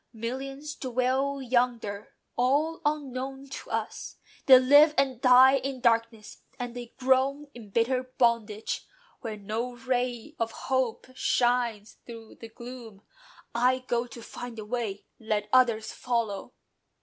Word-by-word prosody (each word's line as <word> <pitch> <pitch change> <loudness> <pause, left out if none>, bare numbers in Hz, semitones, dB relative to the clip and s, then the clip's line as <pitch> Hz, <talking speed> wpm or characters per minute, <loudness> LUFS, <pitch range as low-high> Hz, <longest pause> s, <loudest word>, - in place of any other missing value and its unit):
"Millions 270 +6 -5
dwell 260 +2 -1
yonder: 240 -5 -1 0.2
all 290 +7 +1
unknown 270 -2 -3
to 270 - -9
us, - - -4 0.3
They 260 -1 +10
live 290 +4 +6
and 260 -3 +1
die 260 +1 +7
in 270 0 -4
darkness: 230 -2 0 0.2
and 245 -1 -5
they 240 -1 -8
groan 270 +3 +1
In 230 -4 -12
bitter 235 +5 +1 0.2
bondage, 230 -3 0 0.3
where 220 -3 -6
no 225 +5 -4
ray 250 +3 -2
of 230 -1 -1
hope 260 -3 -1
Shines 240 -4 0
through 230 -2 -11
the 230 - -8
gloom. 235 -3 -11 0.5
I 255 +2 +2
go 240 0 0
to 235 -1 -11
find 245 0 -8
the 215 - -6
way: 215 -3 -4
Let 215 -2 -2
others 235 -4 +3
follow." 230 -5 -2
245 Hz, 130 wpm, -28 LUFS, 230-260 Hz, 0.5 s, They